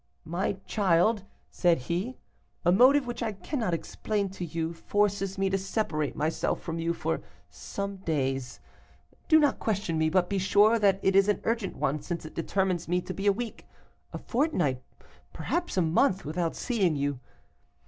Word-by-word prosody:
"'My 170 +5 -1
child,' 200 +1 +2 0.3
said 175 -2 +3
he, 175 - -3 0.5
'a 175 - +5
motive 260 +8 +6
which 240 -1 -5
I 220 - -1
cannot 195 - -2
explain 200 +4 -2
to 185 -1 -7
you, 165 0 -3
forces 195 +2 0
me 195 0 +1
to 195 - +1
separate 185 -7 -2
myself 155 +2 -1
from 165 0 -5
you 165 +1 0
for 80 - -2 0.3
some 200 - -5
days. 135 -8 -2 0.7
Do 315 - +7
not 290 -3 +2
question 200 -7 -1
me, 160 0 +3
but 180 +1 +2
be 200 +1 -1
sure 205 +4 +4
that 195 -2 +3
it 190 - +3
is 195 0 +6
an 210 - +2
urgent 230 -3 -1
one, 145 +2 -1
since 170 +2 -5
it 155 - -9
determines 185 0 -1
me 180 +2 +1
to - - -6
be 195 +1 -3
a - - +7
week, 230 +3 -6 0.4
a - - -5
fortnight, 190 - 0 0.5
perhaps 345 - -2
a 185 - +4
month, 180 +5 +2
without 165 +2 -2
seeing 200 - +1
you. 140 -2 -1
190 Hz, 170 wpm, -28 LUFS, 165-210 Hz, 0.7 s, Do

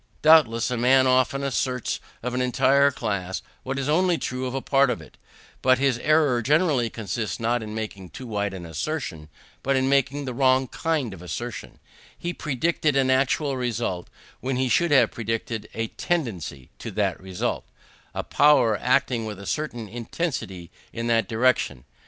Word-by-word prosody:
Doubtless, 140 -7 +5
a 125 - -1
man 130 +2 +5
often 130 +2 +2
asserts 130 -2 -1 0.2
of 125 0 -2
an 125 - 0
entire 135 +2 +4
class 95 -8 -3 0.2
what 135 +1 -4
is 135 0 -2
only 175 +3 +3
true 130 -2 -3
of 125 - -5
a - - 0
part 135 0 +3
of 125 - -1
it; 80 - -14 0.5
but 130 0 +4
his 135 -2 +1
error 150 -4 +3
generally 145 -2 +2
consists 110 -3 -4
not 120 +1 0
in 110 0 -6
making 100 -4 -6
too 130 +11 -9
wide 100 -3 -2
an 90 -2 -7
assertion, 80 - -4 0.3
but 135 0 +1
in 130 0 +2
making 140 +1 +1
the 130 - -4
wrong 130 +1 +3
kind 150 -6 -1
of 90 - -11
assertion: 105 +5 -6 0.4
he 175 0 -4
predicated 155 0 0
an 130 -1 +3
actual 135 +1 +1
result, 115 -7 -2 0.3
when 130 0 -2
he 130 0 0
should 170 +5 +2
only 135 -3 +7
have 115 - +1
predicated 115 -1 -4
a 115 0 -2
tendency 95 - -3
to - - -6
that - - -1
result 95 -1 -3 0.5
a - - -2
power 145 -7 +4
acting 125 -3 +1
with 105 -3 -6
a 100 - -9
certain 120 -6 -3
intensity 110 - -4 0.2
in 115 - -4
that 115 -1 +2
direction. 115 - +1
125 Hz, 175 wpm, -25 LUFS, 110-140 Hz, 0.5 s, only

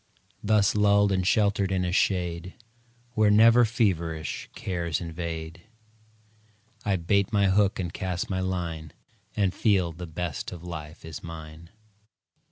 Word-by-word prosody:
Thus 105 -1 +3
lulled 100 -1 +4
and 95 -1 0
sheltered 100 -2 +2
in 95 -1 0
a 90 - -1
shade 90 -2 0 0.6
Where 110 -2 +3
never 115 +3 +6
feverish 85 -9 -1
cares 85 -4 -2
invade, 85 -1 -6 1.2
I 100 - +1
bait 95 +3 +1
my 100 -2 +3
hook 100 +1 +2
and 90 -2 -3
cast 90 -1 -3
my 95 -1 -2
line, 85 -4 -3 0.4
And 100 -3 +1
feel 95 -6 +2
the 85 +2 -8
best 80 -2 -4
of 85 -2 -9
life 80 -3 -8
is 80 -1 -7
mine. 80 0 -10
90 Hz, 135 wpm, -26 LUFS, 85-100 Hz, 1.2 s, never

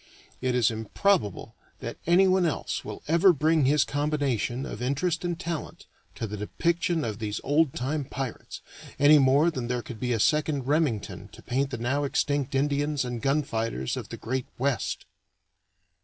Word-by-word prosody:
It 130 -1 0
is 120 -3 +3
improbable 110 - 0 0.3
that - - -6
anyone 185 +1 +5
else 165 -4 -2
will - - -8
ever 170 +5 +6
bring 155 -1 +2
his 145 +2 +4
combination 145 -4 -1
of 110 - -7
interest 155 +7 0
and 175 -1 -2
talent 170 -4 -5 0.3
to - - -3
the 105 0 -5
depiction 170 - 0
of 110 -1 -4
these 105 -1 -3
old 145 0 +2
time 140 +3 -2
Pirates, 130 -2 -6 0.4
any 145 +1 +7
more 140 +5 +4
than 130 -6 -4
there 125 -1 -2
could 115 -3 -8
be 125 -1 -1
a 115 - 0
second 150 +1 +1
Remington 145 -7 0
to - - -13
paint 135 +2 0
the 125 - -4
now 130 +5 0
extinct 140 0 0
Indians 145 0 +1
and 120 -2 -4
gun 140 +4 +2
fighters 110 - -2
of - - -6
the - - -6
Great 130 +2 -3
West. 135 -1 -1
140 Hz, 170 wpm, -27 LUFS, 125-155 Hz, 0.4 s, any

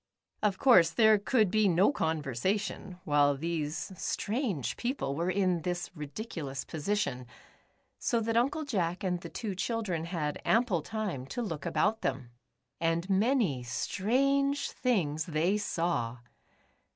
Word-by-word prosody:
Of 205 -3 +1
course, 190 -11 +6
there 220 -2 +5
could 215 -2 +2
be 215 0 +4
no 185 +6 +4
conversation, 180 - -2
while 145 -1 +3
these 155 0 -3
strange 205 - -2
people 240 - -2
were 170 +4 -1
in 185 -2 +1
this 175 +1 -3
ridiculous 150 - -5
position, 155 -7 -2 0.7
so 235 - +1
that 225 +1 -1
Uncle 275 +6 +1
Jack 180 -9 -1
and 180 -2 -1
the 170 - -7
two 210 +1 -4
children 195 -4 -2
had 160 -4 -3
ample 225 -7 +2
time 195 - -4
to 245 - -3
look 165 -9 -4
about 220 +2 +1
them. 130 -2 -3 0.5
And 165 +1 0
many 200 - +2
strange 275 - +1
things 160 - 0
they 175 +5 +1
saw. 165 - -1
185 Hz, 130 wpm, -30 LUFS, 155-220 Hz, 0.7 s, course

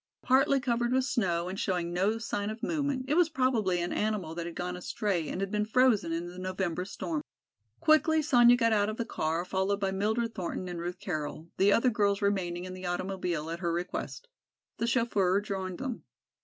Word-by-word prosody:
Partly 270 +1 +4
covered 240 -1 0
with 260 0 +2
snow 180 -9 0
and 190 +2 -4
showing 175 -2 -1
no 195 +5 +1
sign 205 -2 -3
of 220 +2 -7
movement 285 -4 -1
it 285 - +1
was 340 0 +4
probably 245 - +1
an 175 0 -2
animal 210 -7 -1
that 170 0 -4
had 170 - -7
gone 180 0 -3
astray 180 -2 -2
and 195 +1 -3
been 210 0 +1
frozen 220 -5 +3
in 165 +1 -2
the 175 +1 -9
November 185 -1 -2
storm. 300 - -3 0.6
Quickly 315 0 +4
Sonya 245 -4 +6
got 230 -2 +3
out 205 -1 +2
of 215 - -4
the 235 - -2
car 165 -4 -1
followed 190 +2 0
by 195 -1 0
Mildred 220 +4 0
Thornton 185 -1 -4
and 175 -1 -5
Ruth 175 +1 -4
Carroll, 155 -1 -4
the 200 +1 +5
other 245 +4 +4
girls 205 -2 +2
remaining 185 -3 -1
in 185 - -6
the 185 0 -6
automobile 175 -3 -2
at 170 - -4
her 170 -2 -1
request. 180 - -4 0.5
The 230 - 0
chauffeur 205 -6 +2
joined 190 -3 -4
them. 260 -4 -4
200 Hz, 195 wpm, -30 LUFS, 180-235 Hz, 0.6 s, Sonya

